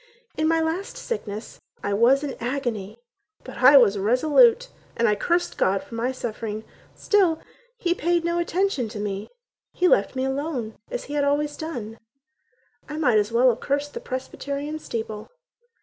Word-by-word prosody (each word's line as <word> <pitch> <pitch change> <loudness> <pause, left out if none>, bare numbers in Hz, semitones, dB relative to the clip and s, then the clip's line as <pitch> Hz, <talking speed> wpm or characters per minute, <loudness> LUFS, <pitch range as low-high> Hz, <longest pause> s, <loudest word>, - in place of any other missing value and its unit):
In 310 - +1
my 325 0 +3
last 325 +5 -2
sickness 220 - -6 0.2
I 200 - -1
was 245 +7 +4
in 280 -3 -3
agony, 235 -5 -3 0.5
but 255 - -10
I 265 +3 +8
was 210 -6 +5
resolute 315 - +4 0.3
And 235 0 +3
I 210 - +4
cursed 345 +11 0
God 195 +1 +2
for - - -14
my 235 +3 -1
suffering; 220 -3 -5 0.3
Still 370 -7 +2 0.4
He 350 -7 +1
paid 345 0 0
no 340 0 0
attention 345 - 0
to 210 - -7
me; 205 -1 -4 0.4
He 365 - +2
left 200 - +3
me 260 0 0
alone, 265 -5 -3
as - - -4
He 290 - -8
had 290 -1 +1
always 290 +1 +1
done. 235 -9 -6 0.9
I 300 - -5
might 250 -9 +4
as 210 +2 -1
well 245 +3 +5
have 235 - 0
cursed 285 +1 -2
the - - -4
Presbyterian 280 +3 -5
steeple. 220 -6 -5
265 Hz, 165 wpm, -24 LUFS, 225-320 Hz, 0.9 s, I